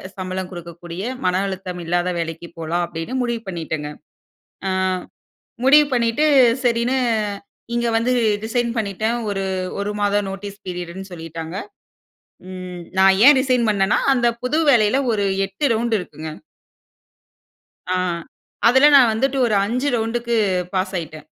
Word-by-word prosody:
சம்பளம் 185 -1 -4
குடுக்கக்கூடிய, 175 +1 -8 0.2
மன 180 0 +2
அழுத்தம் 185 -2 -5
இல்லாத 175 +2 0
வேலைக்கு 165 +1 -5
போலாம்." 165 +2 -1
அப்படீன்னு 165 +8 -6
முடிவு 235 -2 -2
பண்ணிட்டேங்க. 160 -4 -4 0.8
அ - - 0 1.0
முடிவு 295 +3 +7
பண்ணீட்டு, 235 +4 +2 0.4
சரின்னு 240 +2 +1 0.8
இங்க 235 0 0
வந்து 235 +2 +1 0.3
ரிசைன் 235 +1 0
பண்ணிட்டேன். 220 +2 -1
ஒரு 195 -1 -2 0.4
1 200 +1 -2
மாத 205 0 +2
நோட்டீஸ் 200 +1 -8
பீரியடுன்னு 180 +2 -6
சொல்லிட்டாங்க. 165 0 -7 0.9
ம். 185 -1 -7 0.2
நான் 190 0 +5
ஏன் 290 0 +9
ரிசைன் 255 -3 +1
பண்ணேன்னா, 200 0 +2 0.2
அந்த 240 -2 +1 0.2
புது 250 +5 0
வேலையில 235 -1 +4
ஒரு 205 -2 0 0.2
8 195 +9 -2
ரவுண்ட் 230 0 +1
இருக்குங்க. 155 -3 -8 1.6
ஆ. - - +1
ஆ - - +1 0.7
அதில 265 +5 +6
நான் 250 -5 +7
வந்துட்டு 270 +4 0
ஒரு 215 - +1
5 250 +6 -1
ரவுண்ட்க்கு 235 +1 -1 0.4
பாஸ் 190 +1 -1
ஆகிட்டேன். 155 -2 -7
200 Hz, 130 wpm, -21 LUFS, 175-235 Hz, 1.6 s, ஏன்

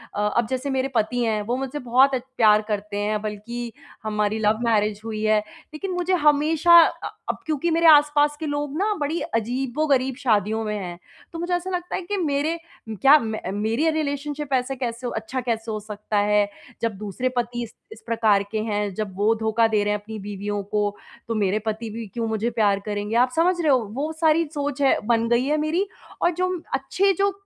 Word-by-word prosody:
अ, - - -2 0.2
अब 235 -2 +2
जैसे 260 +2 -2
मेरे 265 0 0
पति 240 +3 +1
हैं 215 -2 0
वो 250 - +1
मुझसे 270 +2 -4
बहुत 260 +2 +4
अ, - - 0 0.2
प्यार 215 -2 +6
करते 205 0 -3
हैं 210 0 -1
बल्कि 230 +3 -5 0.3
हमारी 210 0 0
लव 215 +1 +3
मैरेज 210 -2 +1
हुई 215 -1 -4
है, 215 0 +4 0.3
लेकिन 370 +5 -4
मुझे 360 +1 0
हमेशा 320 +4 +6
अ, - - -2 0.2
अब - - -1
क्योंकि 315 +2 0
मेरे 330 0 +4
आस-पास 295 -1 +5
के - - -2
लोग 290 +1 -3
ना 420 +2 +1
बड़ी 310 +4 -1
अजीबो-गरीब 260 +1 0
शादियों 220 -3 +1
में 210 0 -2
हैं। 175 -3 -6 0.4
तो 330 - -5
मुझे 350 +1 -2
ऐसा 360 +2 -3
लगता 355 -1 -3
है - - -2
कि 400 +3 -3
मेरे 310 0 0 0.3
क्या 270 +8 +6
मैं 220 -5 -4
मेरी 230 +9 +1
रिलेशनशिप 290 -1 -3
ऐसे 260 +1 0
कैसे 245 -1 -4
अच्छा 220 +4 -3
कैसे 225 -2 -2
हो 215 - -3
सकता 210 0 -4
है? 205 0 +3 0.3
जब 225 -4 -1
दूसरे 210 +5 -2
पति 240 0 -1
इस 225 - -10 0.2
इस - - -11
प्रकार 220 -3 +3
के 215 - -1
हैं, 205 -2 -2
जब 205 -4 -4
वो 215 +2 +3
धोखा 220 +1 +2
दे 210 -2 +1
रहे 210 0 +1
हैं 210 - -1
अपनी 220 +1 -8
बीवियों 205 0 -4
को, 205 0 -1 0.3
तो 230 - -2
मेरे 205 0 +1
पति 220 +1 -3
भी 225 +1 -6
क्यों 230 +3 -3
मुझे 220 +1 -1
प्यार 200 -2 +3
करेंगे? 210 +1 -3
आप 250 +1 +4
समझ 350 +3 +3
रहे 305 -3 +3
हो 255 - +5 0.2
वो 300 +3 -2
सारी 320 +1 +4
सोच 285 -1 -3
है 275 - +4
बन 230 -1 +2
गई 240 +2 +3
है 300 +2 +1
मेरी 330 +6 0 0.3
और 345 - +3
जो 365 +2 -1 0.2
अच्छे 320 +9 +1
जो, 400 +3 +1
240 Hz, 205 wpm, -23 LUFS, 215-295 Hz, 0.4 s, प्यार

